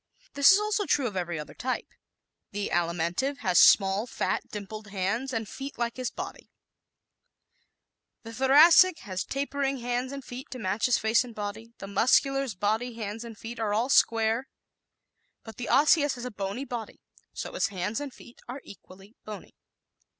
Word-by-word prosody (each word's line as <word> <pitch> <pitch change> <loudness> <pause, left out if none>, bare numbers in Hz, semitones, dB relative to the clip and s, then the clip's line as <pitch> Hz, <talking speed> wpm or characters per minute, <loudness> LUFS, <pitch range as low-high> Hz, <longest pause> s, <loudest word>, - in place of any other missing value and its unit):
This 280 +5 +7
is 385 - +5
also 420 -2 -1
true 280 - +2
of 215 -5 -3
every 175 -2 -2
other 150 - -7
type. 255 +1 -3 0.7
The 205 0 -3
Alimentive 175 +10 0
has 180 -2 +4
small, 195 +3 +5
fat, - - -1
dimpled 215 +1 -7
hands 200 +7 -2
and 225 -3 -3
feet 275 +5 -7
like 235 0 -2
his 255 -2 -2
body; - - -8 1.7
the 225 0 -9
Thoracic 315 +8 +6
has 185 -4 -4
tapering 275 0 -2
hands 245 +1 -2
and 275 -2 -7
feet 255 +4 -8
to 255 - -7
match 210 0 0
his 250 - +3
face 220 +3 +2
and 240 -3 -11
body; 215 +2 -6
the - - -8
Muscular's 255 +4 +2
body, 220 +5 -1
hands 220 0 -5
and 230 -2 -10
feet 230 +2 -8
are 210 -2 0
all 235 +5 0
square; 230 0 +3 1.0
but 225 - -11
the 245 - -5
Osseous 290 +2 +4
has 245 0 -7
a 250 - -5
bony 205 +5 -4
body, 235 -4 -6 0.3
so - - -6
his - - +1
hands 195 +2 -3
and 290 -2 -5
feet 240 - -16
are 260 +3 -7
equally 195 +2 -15
bony. 210 -1 -9
230 Hz, 170 wpm, -27 LUFS, 205-265 Hz, 1.7 s, This